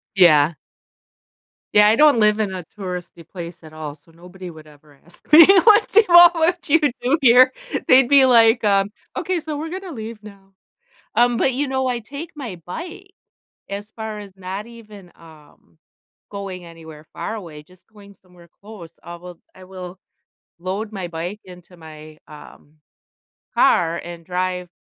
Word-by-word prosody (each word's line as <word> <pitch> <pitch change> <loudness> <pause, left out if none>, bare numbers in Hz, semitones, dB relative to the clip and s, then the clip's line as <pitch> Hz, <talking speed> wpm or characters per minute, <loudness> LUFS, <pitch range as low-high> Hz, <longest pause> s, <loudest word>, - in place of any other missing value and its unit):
Yeah. 165 -4 +5 1.2
Yeah, 210 0 +6
I 215 - +4
don't 295 -5 +5
live 210 0 +3
in 205 -3 -2
a 180 - -7
touristy 180 -4 -8
place 170 -1 -10
at 155 -1 -14
all, 155 -2 -8
so 155 +2 -25
nobody 180 +2 -12
would 155 -2 -14
ever 145 -1 -21
ask 170 - -13
me, 325 +1 +10 0.2
"What 430 -1 +4
do 435 - +6
all 345 0 +9
what 340 0 -1
you 325 +3 +4 0.2
do 265 +6 +1
here?" 255 0 +6 0.4
they'd 255 0 +6
be 275 0 +6
like, 230 -2 +4
um, 200 -1 +1 0.3
"Okay, 370 -2 -2
so 305 -1 -6
we're 315 +2 -6
gonna 375 +1 -7
leave 220 -4 -9
now." 195 -2 -16 0.6
Um, 240 0 +2
but 265 - +1
you 275 +3 -2
know, 265 0 -2
I 245 -1 -1
take 285 +8 -9
my 250 - -8
bike 360 - -9 0.6
as 205 +2 -7
far 220 -1 -7
as 195 -2 -13
not 190 +3 -7
even, 215 -6 -15
um, 150 - -20 0.5
going 195 -3 -8
anywhere 160 -2 -14
far - - -6
away, 165 -8 -10
just 185 +3 -24
going 205 -2 -17
somewhere 180 -2 -22
close. 200 -6 -13
I 175 0 -10
will 175 0 -13
I 185 - -15
will 185 0 -10 0.6
load 195 +5 -5
my 190 -4 -6
bike 175 +5 -6
into 180 -1 -16
my, 155 -1 -13
um, 150 0 -16 0.8
car 170 -1 +2
and 170 -1 -10
drive 180 0 -3
195 Hz, 165 wpm, -20 LUFS, 170-240 Hz, 1.2 s, me